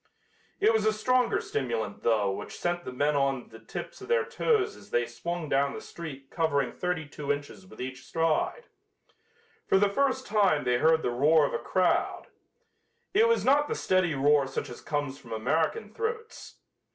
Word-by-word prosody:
It 225 - +4
was 220 -1 +2
a 215 - +3
stronger 250 +3 +2
stimulant, 115 -6 -3
though, 105 -4 +2
which 95 - -6
sent 175 0 -2
the - - -5
men 145 +4 +1
up 140 - +3
on 135 -2 -1
the 115 - -12
tips 110 - -8
of - - -9
their 470 -1 +2
toes 430 -3 +1
as - - -15
they 485 0 +1
swung 170 -2 -5
down 140 0 +1
the - - -5
street 140 -5 -9
covering 145 -6 +1
thirty 180 -4 -2
two 145 0 -3
inches 145 +6 -5
with - - -15
each 130 +1 -6
stride. 165 - 0 1.0
For - - +4
the 200 +1 +4
first 260 +3 +1
time 200 -8 +2
they 125 -1 +2
heard 160 +2 +4
the 120 - 0
roar 145 +5 +4
of - - -3
a - - -1
crowd. 185 -1 0 0.8
It 440 +4 +5
was 465 - +2
not 290 +3 +4
the - - -2
steady 185 -4 +1
roar 140 0 +3
such 135 - -4
as 120 - -9
comes 145 -2 -3
from 115 - -9
American 160 - -1
throats. 450 - -5
160 Hz, 190 wpm, -28 LUFS, 135-215 Hz, 1.0 s, It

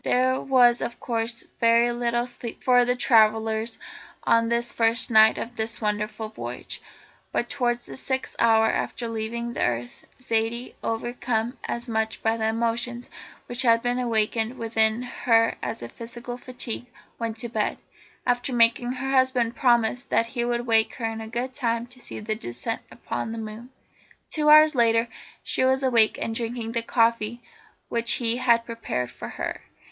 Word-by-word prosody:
There 255 +1 +2
was 245 -3 +4
of 235 - -4
course 230 0 -2 0.2
very 230 +1 +4
little 240 0 0
sleep 240 -2 -8
for 245 -1 +5
the 245 0 +1
travellers 220 -1 +2 0.5
on 230 0 +3
this 235 0 -1
first 230 +2 +3
night 220 0 +6
of 240 +1 -5
their 220 -1 -1
wonderful 210 0 -2
voyage, 215 - -7 0.5
but 240 - -1
towards 245 -3 -1
the - - -9
sixth 260 0 -3
hour 225 -1 +5
after 235 +1 -1
leaving 230 +1 -4
the - - -1
earth, 120 0 -3
Zaidie, 230 0 -1
overcome 235 +1 -2
as 240 +1 -4
much 220 -1 -2
by 225 0 +2
the 220 -1 -1
emotions 235 +2 -2 0.3
which 245 +1 -1
had 230 -2 +4
been 245 +1 0
awakened 225 0 0
within 225 0 +2
her 230 -2 +2
as - - -4
by 120 - -6
physical 240 - -7
fatigue, 245 -1 -5 0.3
went 230 -1 -3
to 235 +1 -4
bed, 220 -2 -1 0.5
after 245 +2 0
making 240 +1 +3
her 270 +1 -3
husband 260 -3 +2
promise 240 -1 +2
that 230 - +1
he 235 +1 -3
would 240 0 -1
wake 225 -2 +2
her 235 - -4
in 225 0 -4
good 245 +3 -3
time 235 -3 -1
to 250 +1 -16
see - - -8
the 215 0 -2
descent 170 - -4
upon 225 - -5
the 230 - -5
moon. 220 +2 -7 0.6
Two 300 -1 +1
hours 305 +1 +8
later 230 -2 +3 0.4
she - - 0
was 265 +1 +2
awake 235 -4 +4
and 225 - -2
drinking 230 0 -3
the 230 0 0
coffee 230 0 +1 0.5
which 235 0 +1
he 235 -1 +1
had 235 -2 +3
prepared 230 - -4
for - - -8
her. - - -5
235 Hz, 165 wpm, -25 LUFS, 225-245 Hz, 0.6 s, hours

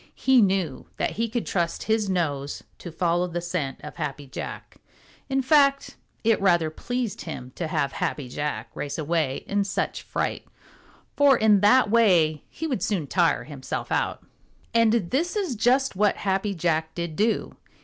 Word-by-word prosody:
He 265 -2 +4
knew 190 -8 0
that - - 0
he 230 +2 -2
could 235 +1 -2
trust 170 -3 -1
his 220 -2 +1
nose 145 -6 -2 0.2
to 175 - -8
follow 175 +2 +1
the 175 0 -3
scent 170 -6 -3
of - - -9
Happy 145 0 -4
Jack. 130 - -8 0.5
In 270 0 +1
fact, 275 0 +3 0.3
it 225 -2 +3
rather 175 -5 +3
pleased 245 +5 -3
him 130 -6 -7
to 170 - -4
have 140 -3 0
Happy 140 -1 -3
Jack 125 -4 -4
race 145 - -4
away 155 -3 -1
in 200 0 0
such 195 - -2
fright, - - -3 0.7
for 280 -3 +5
in 215 -2 +5
that 210 +2 +5
way 175 -10 +4
he 320 - -6
would 260 - -2
soon 185 -7 0
tire 165 +2 +2
himself 140 -3 -6
out. - - -1 0.5
And 230 -1 +4 0.2
this 335 +9 0
is 380 - -1
just 255 +3 +2
what 205 +1 +2
Happy 195 +1 -1
Jack 160 -2 -1
did 170 -2 -4
do. 220 +5 0
185 Hz, 165 wpm, -25 LUFS, 155-230 Hz, 0.7 s, for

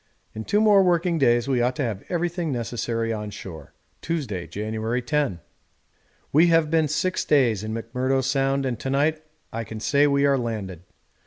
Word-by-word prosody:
In 110 0 -6
two 210 - +2
more 210 -2 +6
working 175 -2 +2
days 120 -2 +3
we 130 -3 +1
ought 125 +1 +1
to 145 - -2
have 110 -5 -3
everything 175 -2 -1
necessary 115 -2 -2
on 105 -1 -5
shore. 90 -5 -10 0.3
Tuesday, 120 - -3
January 110 +4 -3
10. 140 - -1 0.9
We 160 +4 +6
have 165 -2 +3
been 160 -2 +3
six 185 +5 -1
days 120 -9 +2
in 110 - -4
McMurdo 125 +4 -1
Sound 135 +1 0
and 120 -4 -2
to 135 - -4
night 155 +3 +1 0.3
I 115 +1 -3
can 110 0 -8
say 140 +6 +3
we 140 0 +2
are 140 -1 +3
landed. 105 -7 -4
130 Hz, 175 wpm, -24 LUFS, 115-155 Hz, 0.9 s, more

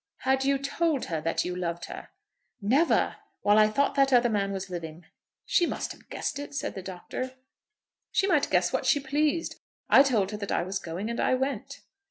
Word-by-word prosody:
"Had 265 0 +2
you 275 0 +2
told 285 +1 0
her 160 -3 -3
that 165 - 0
you 180 0 -3
loved 170 -1 -3
her?" - - -9 0.5
"Never, 265 +11 +2 0.3
while 205 +1 +5
I 215 - +6
thought 280 +6 +1
that 275 -1 +3
other 245 -1 +5
man 200 -2 0
was 190 -1 -4
living." 170 -2 -7 0.4
"She 345 - +3
must - - -3
have - - -14
guessed 285 - -3
it," 285 0 -7
said - - -2
the 190 - -6
Doctor. 190 +8 -6 0.8
"She - - +2
might 395 - +2
guess - - +2
what - - 0
she 290 - +4
pleased. 295 +4 -1 0.3
I - - +9
told 225 -8 +2
her 210 - -4
that 200 -1 -5
I - - +1
was 190 +2 -3
going, 175 +5 -5
and 235 - -4
I - - +3
went." 270 0 -3
235 Hz, 205 wpm, -28 LUFS, 190-275 Hz, 0.8 s, I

